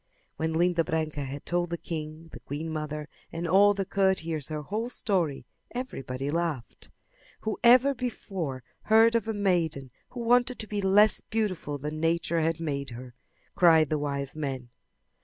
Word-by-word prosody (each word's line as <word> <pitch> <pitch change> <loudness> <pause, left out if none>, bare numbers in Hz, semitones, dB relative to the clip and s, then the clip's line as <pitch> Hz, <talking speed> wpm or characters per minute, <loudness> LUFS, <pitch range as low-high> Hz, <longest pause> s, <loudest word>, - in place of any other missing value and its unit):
When 160 0 -1
Linda 170 0 +2
Branca 155 -2 -2
had 135 +2 -7
told 175 0 0
the 170 - -2
king, 160 0 -6
the - - -8
queen 155 +3 -5
mother 150 -1 -4 0.2
and 165 +1 -3
all 200 +4 +5
the 195 -1 -1
courtiers 165 -7 0
her 155 -1 -4
whole 220 - -3
story 175 - -1 0.3
everybody 135 - -4
laughed. 165 -7 -3 0.5
"Who 215 -1 -3
ever 255 +4 +7
before 195 - -4 0.2
heard 225 +1 +6
of 230 -2 +1
a 220 - -1
maiden 170 -9 0 0.2
who 245 - -7
wanted 245 +1 +3
to 220 - -4
be 205 -1 -2
less 200 +2 +5
beautiful 190 -9 -2
than 150 +2 -5
Nature 165 +1 +1
had 165 0 0
made 140 -4 -3
her!" 125 +1 -9 0.4
cried 160 -4 +5
the 155 - +1
wise 140 -1 -3
men. 135 -5 -4
165 Hz, 160 wpm, -28 LUFS, 150-200 Hz, 0.5 s, ever